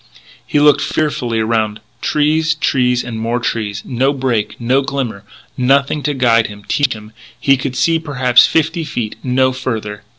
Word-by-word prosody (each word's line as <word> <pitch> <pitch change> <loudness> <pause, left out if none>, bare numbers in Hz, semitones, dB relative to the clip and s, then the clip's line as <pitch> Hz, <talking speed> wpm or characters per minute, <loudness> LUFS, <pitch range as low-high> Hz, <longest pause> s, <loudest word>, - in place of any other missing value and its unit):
He 145 - +1
looked 145 0 +5
fearfully 140 -7 -1
around: 110 -1 0 0.2
trees, 155 +2 +1
trees, 125 -4 +1
and 115 -2 -6
more 115 +2 -1
trees. 105 -4 -3
No 130 +3 +1
break, 120 -6 -2
no 125 +3 +2
glimmer, 130 -7 -4 0.3
nothing 140 +3 +2
to 145 0 -1
guide 115 -3 +3
him, 105 0 -11
teach 145 -3 +1
him. 105 -1 -11 0.3
He 135 - +4
could 130 0 -4
see, 165 +3 +2
perhaps, 130 -6 +4
fifty 160 +1 0
feet; 120 -8 -4
no 130 0 +2
further. 110 -5 -4
125 Hz, 160 wpm, -16 LUFS, 115-140 Hz, 0.3 s, looked